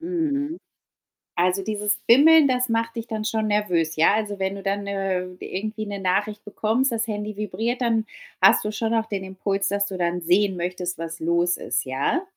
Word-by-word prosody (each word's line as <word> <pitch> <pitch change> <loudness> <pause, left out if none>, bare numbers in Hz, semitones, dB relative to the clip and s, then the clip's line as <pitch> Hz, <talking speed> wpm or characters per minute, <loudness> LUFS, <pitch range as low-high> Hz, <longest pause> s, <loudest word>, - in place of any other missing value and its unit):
Mhm. 325 -3 -2 0.8
Also, 180 +2 +2
dieses 210 0 -1
Bimmeln, 295 +4 +7
das 250 0 +1
macht 230 +1 -1
dich 230 0 -4
dann 215 -2 -4
schon 220 0 0
nervös, 180 -7 +1
ja? 160 +5 +4
Also, 205 -2 -2
wenn 190 +1 -1
du 195 - -8
dann, 200 +1 -2
äh, 195 -2 -1 0.2
irgendwie 215 +2 -4
'ne 200 -1 -5
Nachricht 205 +3 -1
bekommst, 225 +6 0
das 230 0 -1
Handy 210 -1 -4
vibriert, 220 +5 -2
dann 225 -2 +1 0.4
hast - - +6
du 210 - -2
schon 225 +1 -2
auch 225 0 +1
den 200 -3 -4
Impuls, 195 +1 -2
dass 200 0 0
du 190 - -5
dann 175 0 -1
sehen 185 +3 +2
möchtest, 180 0 -3
was 165 0 -6
los 170 +2 +1
ist, 120 0 -2
ja? 135 - 0
205 Hz, 190 wpm, -24 LUFS, 185-225 Hz, 0.8 s, Bimmeln